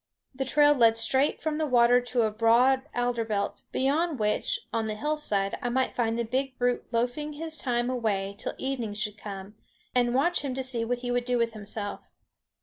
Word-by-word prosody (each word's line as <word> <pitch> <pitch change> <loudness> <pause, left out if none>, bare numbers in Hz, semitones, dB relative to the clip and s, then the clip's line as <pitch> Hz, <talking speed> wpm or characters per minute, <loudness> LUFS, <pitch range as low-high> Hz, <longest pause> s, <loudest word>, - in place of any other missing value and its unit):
The 265 +1 -3
trail 295 +2 +5
led 230 -4 +4
straight 265 +5 +3
from 310 0 -1
the 310 - 0
water 245 -1 +5
to 245 -1 0
a 215 - +1
broad 250 +6 +3
alder 245 -1 0
belt, 205 -2 -2
beyond 295 +4 +1
which, 215 - 0
on 225 -1 0
the 215 - -3
hillside, 215 -7 -1
I 245 - -1
might 260 +2 0
find 230 -1 0
the 235 - -1
big 260 +3 -2
brute 245 -1 -1
loafing 250 +6 -1
his 320 +1 -4
time 240 -2 0
away 210 -6 -1
till - - -4
evening 245 -6 -3
should 210 -1 -3
come, 195 -1 -8 0.4
and 245 -1 +2
watch 345 +7 +2
him 270 -3 -3
to 265 - -2
see 250 -3 -1
what 245 +1 -2
he 245 - -1
would 245 0 0
do 250 0 +1
with 230 -1 0
himself. 205 -1 -4
245 Hz, 200 wpm, -27 LUFS, 225-265 Hz, 0.4 s, trail